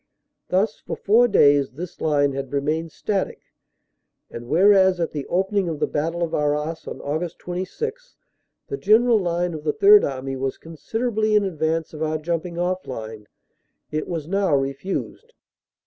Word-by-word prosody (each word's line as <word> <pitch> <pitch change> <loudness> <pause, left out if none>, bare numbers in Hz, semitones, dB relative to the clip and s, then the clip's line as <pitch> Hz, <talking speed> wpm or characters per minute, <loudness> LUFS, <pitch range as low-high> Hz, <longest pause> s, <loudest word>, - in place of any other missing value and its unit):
Thus, 200 +4 +1
for - - -5
four 230 +4 +4
days, 145 - +4
this 170 +5 -8
line 145 -2 +2
had 135 -1 -5
remained 155 +3 -1
static, 200 +3 -2 0.9
and, 120 0 -8
whereas 190 +3 +5
at 165 - -1
the 145 -3 -5
opening 190 0 0
of 155 -3 -4
the - - +2
battle 165 +3 -2
of 165 - -3
Arras 150 +2 -1
on - - -5
Aug. 160 +4 -3
26 450 - -5 0.5
the 415 - -4
general 230 - +4
line 175 -1 -1
of 155 -1 -7
the 150 - +1
Third 205 0 +7
Army 135 0 -3
was 135 0 -3
considerably 215 - -2
in 210 - +4
advance 165 -3 -1
of 155 - -8
our 155 0 0
jumping 170 +2 -3
off 180 +1 -2
line, 110 -4 -7 0.6
it 155 0 -2
was 165 -4 -4
now 195 -4 +1
refused. 140 - -3
165 Hz, 160 wpm, -23 LUFS, 150-195 Hz, 0.9 s, Third